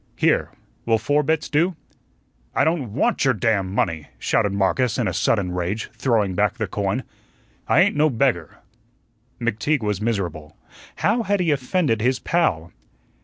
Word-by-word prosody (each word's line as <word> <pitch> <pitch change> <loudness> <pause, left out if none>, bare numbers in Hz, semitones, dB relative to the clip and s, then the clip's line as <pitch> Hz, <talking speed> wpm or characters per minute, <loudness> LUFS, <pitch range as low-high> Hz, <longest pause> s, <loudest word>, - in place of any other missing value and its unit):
Here, - - +2 0.4
will 115 -1 +4
four 145 +7 +1
bits 155 +1 0
do?" 165 +4 +1 0.8
"I - - +3
don't 155 -10 0
WANT - - +1
your 130 -3 +3
damn 100 -2 0
money," 85 -6 -1
shouted 100 - +1
Marcus 100 +5 +1
in - - 0
a - - -1
sudden 95 -3 +1
rage, 90 +5 -3
throwing 115 -5 +1
back 90 - +1
the - - -1
coin. - - -2 0.6
"I 155 - +5
ain't 200 -2 +3
no 155 +1 +3
beggar." 115 - 0 0.8
McTeague 120 +4 0
was 105 -1 -1
miserable. 90 -9 -3 0.4
How 240 - +1
had 205 -2 0
he 170 -3 +2
offended 135 - 0
his 125 +2 +2
pal? 95 - 0
115 Hz, 155 wpm, -22 LUFS, 100-150 Hz, 0.8 s, I